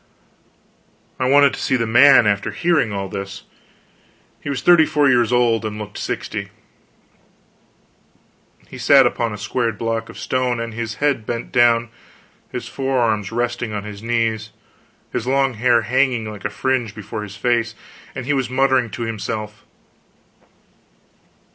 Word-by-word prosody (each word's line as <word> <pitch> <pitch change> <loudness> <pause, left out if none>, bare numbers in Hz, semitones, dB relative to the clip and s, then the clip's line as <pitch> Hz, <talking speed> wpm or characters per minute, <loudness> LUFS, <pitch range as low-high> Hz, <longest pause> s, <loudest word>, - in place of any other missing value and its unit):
I 130 0 +1
wanted 140 0 +5
to - - -6
see 130 - 0
the 120 -2 0
man, 120 +2 +6
after 100 -1 +1
hearing 170 -10 +1
all 100 -1 -3
this. 95 +1 -7 1.0
He - - -6
was 135 -2 -3
thirty 175 -3 +6
four 145 -1 +2
years 120 -3 +3
old, 120 -2 +2
and 105 -1 -4
looked 105 -1 -7
sixty. - - -4 2.2
He - - -11
sat - - +6
upon 115 -1 0
a 105 - -6
squared 115 +1 -2
block 115 -1 -3
of - - -11
stone, 125 -1 -1
with 115 -1 -5
his 110 -1 -4
head 140 -4 0
bent 115 0 -4
down, 120 -1 +3 0.6
his - - -5
forearms 120 -7 -1
resting 120 -1 -2
on 105 -1 -4
his 105 -1 -9
knees, 115 -1 -1 0.6
his 115 - -3
long 135 0 +2
hair 120 0 +2
hanging 125 -1 +1
like 105 -1 -10
a - - 0
fringe 120 -1 -1
before 105 0 -6
his 105 -1 -8
face, 115 0 0 0.4
and 130 - -5
he 145 - 0
was 135 -3 -1
muttering 130 -2 +2
to 120 - -5
himself. 105 -1 -5
115 Hz, 150 wpm, -20 LUFS, 110-130 Hz, 2.2 s, man